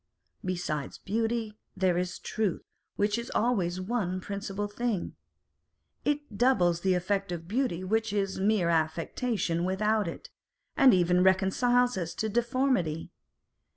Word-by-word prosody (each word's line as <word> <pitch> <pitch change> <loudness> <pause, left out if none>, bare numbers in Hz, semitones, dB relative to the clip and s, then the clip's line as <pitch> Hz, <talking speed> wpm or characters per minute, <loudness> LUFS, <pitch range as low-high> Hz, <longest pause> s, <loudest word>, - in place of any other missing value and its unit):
Besides 175 -6 -3
beauty, 225 0 -2 0.2
there 185 -2 +2
is 180 0 -2
truth, 215 -5 -2 0.3
which 205 +2 +1
is 235 - -6
always 190 -7 +1
one 185 -2 -1
principal 200 +1 -4
thing. 210 -2 -2 0.9
It 290 -8 -2
doubles 180 -10 +3
the 190 0 +2
effect 195 +1 -1
of 165 -1 -5
beauty, 220 -4 -1
which 220 +3 0
is 195 -2 -1
mere 195 -3 +2
affectation 170 +3 0
without 210 +3 +1
it, - - -7 0.4
and 270 -2 +7
even 180 -1 +3
reconciles 200 +5 +3
us 170 -2 -4
to 220 - -1
deformity. 240 - 0
195 Hz, 125 wpm, -29 LUFS, 180-225 Hz, 0.9 s, and